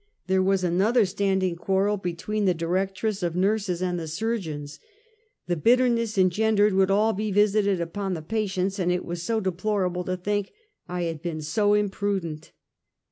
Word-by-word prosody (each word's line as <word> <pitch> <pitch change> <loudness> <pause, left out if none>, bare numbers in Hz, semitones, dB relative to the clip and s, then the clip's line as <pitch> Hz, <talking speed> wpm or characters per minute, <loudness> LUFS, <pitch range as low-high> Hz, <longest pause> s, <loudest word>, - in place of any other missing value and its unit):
There 190 0 +2
was 190 0 +2
another 200 +7 +3
standing 190 -2 0
quarrel 195 +4 +1
be 180 -4 -4
tween 210 +4 -2
the 180 -2 +3
directress 190 +5 -1
of 170 -1 -1
nurses 190 -1 0
and 180 -1 -1
the 165 - -5
surgeons. 160 -6 -4 0.7
The 175 - 0
bitterness 230 +3 +2
engendered 205 +3 +3
would 190 0 +3
all 210 +3 +3
be 210 +2 -2
visited 205 -1 +3
upon 185 +3 -3
the 160 - -6
patients, 195 0 -1
and 180 -1 +1
it 180 0 -1
was 175 0 -4
so 225 +5 0
deplorable 185 -1 -1
to 185 +1 -2
think 205 +2 -2 0.3
I 180 0 -3
had 165 -3 -3
been 165 -3 -4
so 205 +6 +2
imprudent. 195 -6 -2
190 Hz, 165 wpm, -25 LUFS, 175-210 Hz, 0.7 s, another